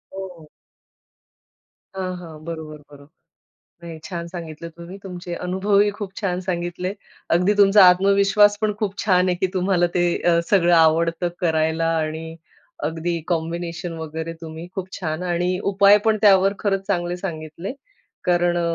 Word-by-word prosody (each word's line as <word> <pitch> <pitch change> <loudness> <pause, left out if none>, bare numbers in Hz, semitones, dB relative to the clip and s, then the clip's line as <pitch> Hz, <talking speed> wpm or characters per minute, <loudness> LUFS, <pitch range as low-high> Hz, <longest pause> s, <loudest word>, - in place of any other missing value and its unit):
हो. 180 -5 -9 1.5
हां, 185 -1 -3
हां. 160 -3 -11
बरोबर, 160 -2 -6
बरोबर, 140 0 -15 0.8
नाही 165 -1 -8
छान 170 -2 -5
सांगितलं 170 -2 -8
तुम्ही 170 +3 -9
तुमचे 175 -2 -7
अनुभवही 200 +3 +2
खूप 205 -2 -7
छान 185 -3 -2
सांगितले. 180 +1 -3 0.4
अगदी 180 +4 +3
तुमचा 200 0 +7
आत्मविश्वास 200 +2 +4
पण 215 -1 +1
खूप 200 -2 -2
छान 185 -2 +3
आहे 180 - +1
की 190 +1 0
तुम्हाला 185 -1 +2
ते 175 - +3 0.2
अ, 170 -1 +3
सगळं 175 -3 +4
आवडतं 165 +2 +3
करायला 160 -1 +1
आणि 160 +1 -4 0.5
अगदी 165 +1 -3
कॉम्बिनेशन 170 +1 -3
वगैरे 160 +1 -5
तुम्ही 160 +1 -8
खूप 190 -1 -5
छान 160 0 -3
आणि 180 +1 0
उपाय 200 +1 +6
पण 220 -1 +3
त्यावर 195 -1 +5
खरंच 195 -2 -1
चांगले 175 -2 -1
सांगितले. 170 +1 -6 0.5
कारण 175 -1 +2
अ, 175 - +1
175 Hz, 140 wpm, -22 LUFS, 165-195 Hz, 1.5 s, तुमचा